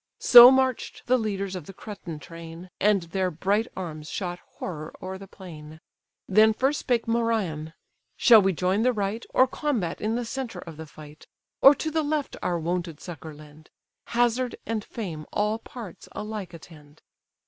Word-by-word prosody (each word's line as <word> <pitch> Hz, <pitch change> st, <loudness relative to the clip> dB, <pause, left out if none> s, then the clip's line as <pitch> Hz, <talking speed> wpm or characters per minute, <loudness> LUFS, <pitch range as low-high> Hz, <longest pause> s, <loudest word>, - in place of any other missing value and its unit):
So 240 Hz, 0 st, +10 dB
march'd 260 Hz, -1 st, 0 dB
the 255 Hz, -, +3 dB
leaders 200 Hz, -3 st, -3 dB
of 175 Hz, -5 st, -7 dB
the 195 Hz, -, -10 dB
Cretan 190 Hz, -7 st, -8 dB
train, 165 Hz, +3 st, -11 dB
And 205 Hz, -2 st, +3 dB
their 185 Hz, +2 st, -1 dB
bright 200 Hz, +7 st, 0 dB
arms 155 Hz, -4 st, -6 dB
shot 175 Hz, -2 st, -4 dB, 0.2 s
horror 155 Hz, -3 st, -6 dB
o'er 190 Hz, 0 st, -6 dB
the 195 Hz, -, -11 dB
plain. 155 Hz, -5 st, -12 dB, 0.5 s
Then 215 Hz, +2 st, +5 dB
first 270 Hz, +5 st, +1 dB
spake 240 Hz, -3 st, 0 dB
Merion: 215 Hz, -10 st, -1 dB, 0.4 s
"Shall 230 Hz, -4 st, +7 dB
we 195 Hz, 0 st, +2 dB
join 185 Hz, +4 st, 0 dB
the 250 Hz, +2 st, +3 dB
right, 210 Hz, +1 st, -2 dB
Or 260 Hz, -, +5 dB
combat 255 Hz, -, -2 dB
in 220 Hz, +2 st, -1 dB
the 240 Hz, 0 st, -2 dB
centre 240 Hz, -4 st, -5 dB
of 165 Hz, -3 st, -10 dB
the 160 Hz, 0 st, -8 dB
fight? 150 Hz, 0 st, -14 dB, 0.3 s
Or 275 Hz, +2 st, +9 dB
to 315 Hz, -, -3 dB
the 320 Hz, +1 st, +1 dB
left 300 Hz, -1 st, -2 dB
our 175 Hz, -, 0 dB
wonted 170 Hz, -1 st, -3 dB
succour 160 Hz, -3 st, -9 dB
lend? 150 Hz, +1 st, -16 dB, 0.4 s
Hazard 240 Hz, +1 st, 0 dB
and 225 Hz, -2 st, -2 dB
fame 170 Hz, -11 st, -7 dB
all 210 Hz, +2 st, 0 dB
parts 225 Hz, -6 st, -10 dB
alike 210 Hz, -5 st, -6 dB
attend." 155 Hz, -2 st, -16 dB
195 Hz, 170 wpm, -26 LUFS, 165-230 Hz, 0.5 s, So